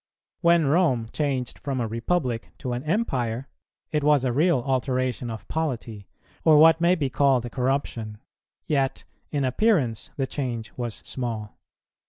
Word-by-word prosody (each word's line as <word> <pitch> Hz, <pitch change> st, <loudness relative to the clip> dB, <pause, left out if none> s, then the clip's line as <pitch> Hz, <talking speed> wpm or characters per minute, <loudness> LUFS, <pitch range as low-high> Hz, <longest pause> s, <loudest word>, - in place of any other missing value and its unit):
When 170 Hz, -2 st, +4 dB
Rome 135 Hz, -7 st, +2 dB
changed 135 Hz, -5 st, -2 dB
from 135 Hz, -2 st, -3 dB
a 115 Hz, -, 0 dB
Republic 120 Hz, +1 st, -1 dB
to 125 Hz, -3 st, -4 dB
an 120 Hz, -, -3 dB
Empire, 135 Hz, -, -1 dB, 0.4 s
it 150 Hz, -2 st, 0 dB
was 145 Hz, -2 st, +4 dB
a 125 Hz, -, +1 dB
real 155 Hz, 0 st, +3 dB
alteration 130 Hz, -2 st, -1 dB
of 110 Hz, -2 st, -7 dB
polity, 120 Hz, -10 st, -3 dB, 0.4 s
or 155 Hz, -2 st, +6 dB
what 160 Hz, +1 st, +7 dB
may 175 Hz, +1 st, +4 dB
be 150 Hz, -6 st, -1 dB
called 135 Hz, -3 st, +3 dB
a 120 Hz, -, -6 dB
corruption; 125 Hz, -4 st, -2 dB, 0.5 s
yet 135 Hz, -3 st, 0 dB, 0.3 s
in 140 Hz, -3 st, 0 dB
appearance 130 Hz, -, +1 dB
the 135 Hz, -, 0 dB
change 120 Hz, -5 st, -4 dB
was 120 Hz, -3 st, -5 dB
small. 115 Hz, -5 st, -4 dB
130 Hz, 150 wpm, -25 LUFS, 120-150 Hz, 0.5 s, what